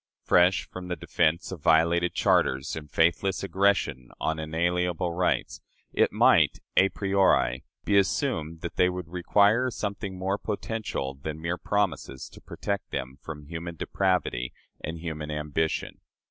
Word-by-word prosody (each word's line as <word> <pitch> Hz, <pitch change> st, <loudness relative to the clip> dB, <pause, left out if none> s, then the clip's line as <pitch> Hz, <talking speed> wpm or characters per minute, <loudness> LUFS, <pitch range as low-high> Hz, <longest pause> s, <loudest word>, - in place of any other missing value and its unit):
Fresh 90 Hz, +2 st, +4 dB
from 90 Hz, -1 st, -8 dB
the 90 Hz, -, -2 dB
defense 85 Hz, +1 st, 0 dB
of 90 Hz, -5 st, -7 dB
violated 85 Hz, +3 st, +3 dB
charters 65 Hz, +1 st, +2 dB
and 75 Hz, -2 st, -8 dB
faithless 85 Hz, +5 st, +1 dB
aggression 95 Hz, -9 st, +1 dB
on 80 Hz, 0 st, -1 dB
inalienable 85 Hz, +2 st, 0 dB
rights, 90 Hz, +1 st, 0 dB, 0.3 s
it -, -, +3 dB
might, -, -, +4 dB, 0.2 s
a 95 Hz, +1 st, +5 dB
priori, 95 Hz, -, +2 dB, 0.2 s
be 100 Hz, -1 st, +5 dB
assumed 85 Hz, -, -1 dB
that 85 Hz, -, -6 dB
they 90 Hz, -, +4 dB
would 90 Hz, -2 st, -5 dB
require 100 Hz, +7 st, +3 dB
something 100 Hz, -4 st, -4 dB
more 95 Hz, +2 st, -1 dB
potential 105 Hz, -10 st, -3 dB
than 75 Hz, +3 st, -6 dB
mere 85 Hz, +2 st, -2 dB
promises 85 Hz, -10 st, -1 dB
to -, -, -15 dB
protect 100 Hz, -1 st, -4 dB
them 65 Hz, +1 st, -5 dB
from 75 Hz, -2 st, -8 dB
human 85 Hz, +2 st, -6 dB
depravity 90 Hz, -10 st, 0 dB, 0.3 s
and 80 Hz, +2 st, -4 dB
human 80 Hz, -2 st, -5 dB
ambition. 75 Hz, +1 st, -2 dB
85 Hz, 140 wpm, -27 LUFS, 80-95 Hz, 0.3 s, a